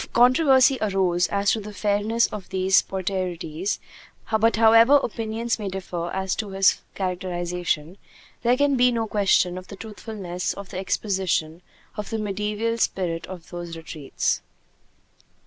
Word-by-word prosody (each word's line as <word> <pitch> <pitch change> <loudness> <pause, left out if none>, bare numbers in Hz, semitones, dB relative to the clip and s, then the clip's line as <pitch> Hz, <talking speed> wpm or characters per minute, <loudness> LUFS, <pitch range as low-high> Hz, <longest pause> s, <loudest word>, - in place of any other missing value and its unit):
A - - -10
controversy 260 +2 +5
arose 190 -4 +1
as 200 0 +1
to 225 - 0
the 210 0 -8
fairness 210 +3 +1
of 205 -3 -7
these 190 0 +3
portraitures; 185 -2 -3 0.6
but 225 +1 +3
however 230 +4 +6
opinions 230 +1 -2
may 205 -2 -3
differ 180 -2 -4
as 190 0 -2
to 215 -2 -3
his 195 0 +3
characterization, 180 -2 -3 0.4
there 245 +1 +3
can 285 0 +3
be 250 0 +4
no 230 -2 -1
question 195 -4 +2
of 185 - -14
the - - -9
truthfulness 200 -4 -5
of 200 -1 -9
the 185 - -5
exposition 185 -5 -1 0.4
of 210 -1 -4
the 225 - -2
mediaeval 210 +2 -2
spirit 165 -6 -1
of 180 -3 -10
those 175 -1 -6
retreats. 155 -4 -2
195 Hz, 145 wpm, -24 LUFS, 180-220 Hz, 0.6 s, however